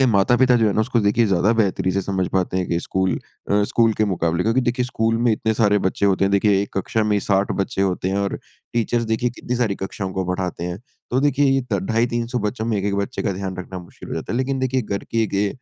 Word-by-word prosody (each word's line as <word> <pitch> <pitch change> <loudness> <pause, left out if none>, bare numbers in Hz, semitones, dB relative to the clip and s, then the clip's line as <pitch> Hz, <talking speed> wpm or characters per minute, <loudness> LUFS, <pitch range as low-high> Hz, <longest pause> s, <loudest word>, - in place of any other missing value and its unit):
के 135 - +5
माता-पिता 120 +4 +4
जो 115 -2 +3
है 105 - +2
ना - - +1
उसको 115 +2 +1
देखिए 105 +3 +3
ज़्यादा 95 +2 +3
बेहतरी 95 -2 +1
से 100 - 0
समझ 95 -1 -1
पाते 95 -1 0
हैं 90 -1 0
कि 85 - +1
स्कूल 95 +1 0 0.4
अ, 105 +1 +4
स्कूल 115 +2 +2
के 110 - +1
मुकाबले। 85 -3 0
क्योंकि 115 +5 +2
देखिए, 125 0 0
स्कूल 115 -2 0
में 120 -1 +3
इतने 110 +1 0
सारे 105 -2 +3
बच्चे 100 +1 +1
होते 95 0 +2
हैं 95 - +1
देखिए, 100 0 +3
1 100 - -5
कक्षा 110 +3 0
में 105 - +1
ही 100 - +1
60 100 0 +1
बच्चे 95 0 -1
होते 95 -1 0
हैं 95 - 0
और 100 0 -1 0.3
टीचर्स 120 0 0
देखिए 110 +2 0
कितनी 125 +1 -4
सारी 115 -5 +1
कक्षाओं 95 0 -5
को 95 -1 -2
पढ़ाते 90 -2 -3
हैं। 90 +1 -4 0.3
तो 130 +2 +2
देखिए 145 0 +3
ये 135 0 +3
त 100 - +2
ढाई, 115 +4 +1
300 120 +1 -2
बच्चों 110 +1 -2
में 115 -2 0
1-1 100 +1 -1
बच्चे 100 +5 -2
का 100 - 0
ध्यान 95 0 -4
रखना 90 0 -6
मुश्किल 90 -1 -12
हो - - -4
जाता 80 - -4
है। 120 - -1
लेकिन 130 +1 -1
देखिए 130 0 0
घर 100 -2 -4
के 115 -1 +1
गे 100 0 0
105 Hz, 260 wpm, -21 LUFS, 95-120 Hz, 0.4 s, के